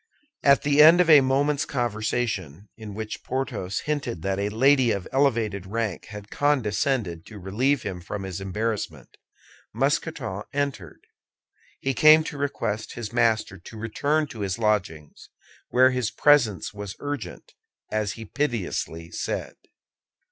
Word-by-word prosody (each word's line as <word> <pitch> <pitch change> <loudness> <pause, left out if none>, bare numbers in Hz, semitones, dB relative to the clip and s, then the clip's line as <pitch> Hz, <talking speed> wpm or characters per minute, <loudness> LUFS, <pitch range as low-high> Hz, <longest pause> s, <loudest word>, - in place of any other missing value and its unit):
At 140 -1 +4
the 145 0 +4
end 165 +3 +8
of 175 -2 +5
a 150 -2 +9
moment's 140 +2 +1
conversation, 110 - -2
in 105 -3 -9
which 110 0 -6
Porthos 125 -8 -3
hinted 135 - -3
that 95 0 -1
a 100 +1 0
lady 130 +3 +4
of 100 -4 -2
elevated 115 -8 +1
rank 110 -4 -3
had 105 -1 -10
condescended 120 - 0
to 110 - -10
relieve 115 +10 0
him 95 -3 -5
from 100 +3 -6
his 95 0 -5
embarrassment, 105 +3 -4 0.6
Mousqueton 135 - -1
entered. 135 - -3 0.8
He 135 - -1
came 155 +4 +7
to 150 - -6
request 115 -6 -3
his 115 -3 -6
master 110 -4 +1
to 110 +6 -12
return 140 +8 0
to 115 - -10
his 100 -2 -2
lodgings, 100 -9 -2 0.4
where 130 +1 +5
his 125 -4 -1
presence 120 -11 +3
was 100 -1 -7
urgent, 145 -11 -6 0.4
as 105 -1 -1
he 115 -1 -9
piteously 100 - -3
said. - - -4
115 Hz, 140 wpm, -25 LUFS, 100-140 Hz, 0.8 s, a